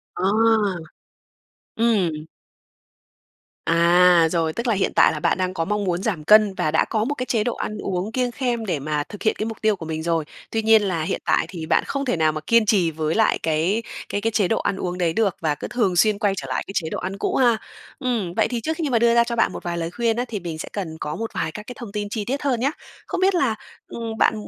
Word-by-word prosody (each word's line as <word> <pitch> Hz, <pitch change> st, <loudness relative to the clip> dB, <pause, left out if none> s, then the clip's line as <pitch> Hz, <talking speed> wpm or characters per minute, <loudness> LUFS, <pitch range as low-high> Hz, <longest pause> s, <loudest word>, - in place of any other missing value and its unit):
À. 190 Hz, -, +1 dB, 1.5 s
Ừm. 185 Hz, -10 st, +1 dB, 1.4 s
À, 170 Hz, 0 st, +5 dB
rồi, 165 Hz, -2 st, 0 dB
tức 235 Hz, +7 st, -3 dB
là 230 Hz, -, +3 dB
hiện 195 Hz, -2 st, 0 dB
tại -, -, +6 dB
là -, -, -4 dB
bạn -, -, +1 dB
đang 185 Hz, 0 st, -1 dB
có 165 Hz, -3 st, -2 dB
mong 210 Hz, +2 st, -1 dB
muốn 180 Hz, -1 st, -1 dB
giảm 185 Hz, -9 st, -2 dB
cân 210 Hz, +3 st, +6 dB
và 155 Hz, -4 st, -1 dB
đã 160 Hz, -, +3 dB
có 215 Hz, -2 st, -1 dB
một 285 Hz, +6 st, -2 dB
cái 255 Hz, -, -3 dB
chế 225 Hz, -4 st, 0 dB
độ 240 Hz, -, -1 dB
ăn 215 Hz, -, -4 dB
uống 190 Hz, +2 st, -3 dB
kiêng 250 Hz, 0 st, 0 dB
khem 240 Hz, -2 st, -2 dB
để 175 Hz, -7 st, -1 dB
mà 150 Hz, +1 st, -2 dB
thực 205 Hz, -, -9 dB
hiện 220 Hz, -, +2 dB
cái 215 Hz, -, -2 dB
mục 225 Hz, 0 st, -5 dB
tiêu 215 Hz, -1 st, +3 dB
của 170 Hz, -, -8 dB
mình 160 Hz, 0 st, -4 dB
rồi. 165 Hz, -2 st, 0 dB, 0.3 s
Tuy 225 Hz, -, 0 dB
nhiên 220 Hz, 0 st, +5 dB
là 185 Hz, -5 st, -1 dB
hiện -, -, -2 dB
tại -, -, +2 dB
thì 170 Hz, -4 st, -6 dB
bạn -, -, +2 dB
không 280 Hz, 0 st, -2 dB
thể 245 Hz, -, 0 dB
nào 155 Hz, -1 st, +3 dB
mà 155 Hz, 0 st, -5 dB
kiên 230 Hz, -1 st, +4 dB
trì 190 Hz, -6 st, +3 dB
với 155 Hz, 0 st, -2 dB
lại 220 Hz, -1 st, +3 dB
cái 165 Hz, +8 st, +1 dB, 0.3 s
cái 205 Hz, -, -2 dB
cái 225 Hz, +2 st, 0 dB
chế 205 Hz, -4 st, +2 dB
độ 225 Hz, -, +1 dB
ăn -, -, -1 dB
uống 180 Hz, -1 st, -3 dB
đấy 170 Hz, -3 st, +1 dB
được, 210 Hz, -3 st, +1 dB
và 155 Hz, -3 st, 0 dB
cứ -, -, -6 dB
thường 205 Hz, -7 st, 0 dB
xuyên 210 Hz, +3 st, +3 dB
quay 205 Hz, -3 st, +2 dB
trở -, -, -5 dB
lại -, -, -1 dB
cái 195 Hz, -, -7 dB
chế 160 Hz, -3 st, -1 dB
độ -, -, -3 dB
ăn 190 Hz, +2 st, -4 dB
cũ -, -, -1 dB
ha. 240 Hz, -4 st, +4 dB, 0.4 s
Ừm, 235 Hz, -10 st, -1 dB
vậy -, -, +2 dB
thì 240 Hz, -2 st, -3 dB
trước 320 Hz, +6 st, -2 dB
khi 320 Hz, -4 st, -1 dB
mà 240 Hz, -3 st, +2 dB
đưa 235 Hz, 0 st, +4 dB
ra 235 Hz, -, +6 dB
cho 235 Hz, 0 st, -3 dB
bạn 230 Hz, -, +2 dB
một -, -, -7 dB
vài 175 Hz, -1 st, -3 dB
lời 165 Hz, 0 st, -3 dB
khuyên 230 Hz, +3 st, 0 dB
á, 245 Hz, -, 0 dB
thì 215 Hz, -4 st, -4 dB
mình 170 Hz, -3 st, -6 dB
sẽ -, -, -6 dB
cần 170 Hz, -6 st, -4 dB
có 150 Hz, -, -4 dB
một 225 Hz, 0 st, -5 dB
vài 160 Hz, -, -2 dB
các 210 Hz, -, -8 dB
cái 250 Hz, -, -7 dB
thông 235 Hz, -4 st, -7 dB
tin 205 Hz, -1 st, -3 dB
chi 210 Hz, -1 st, -3 dB
tiết 275 Hz, +5 st, -2 dB
hơn 265 Hz, -5 st, 0 dB
nhá. 270 Hz, +4 st, +1 dB, 0.4 s
Không -, -, -3 dB
biết 380 Hz, 0 st, +3 dB
là, 265 Hz, -10 st, +2 dB, 0.3 s
ừm, 225 Hz, -1 st, -6 dB
bạn -, -, +4 dB
205 Hz, 265 wpm, -22 LUFS, 170-230 Hz, 1.5 s, tại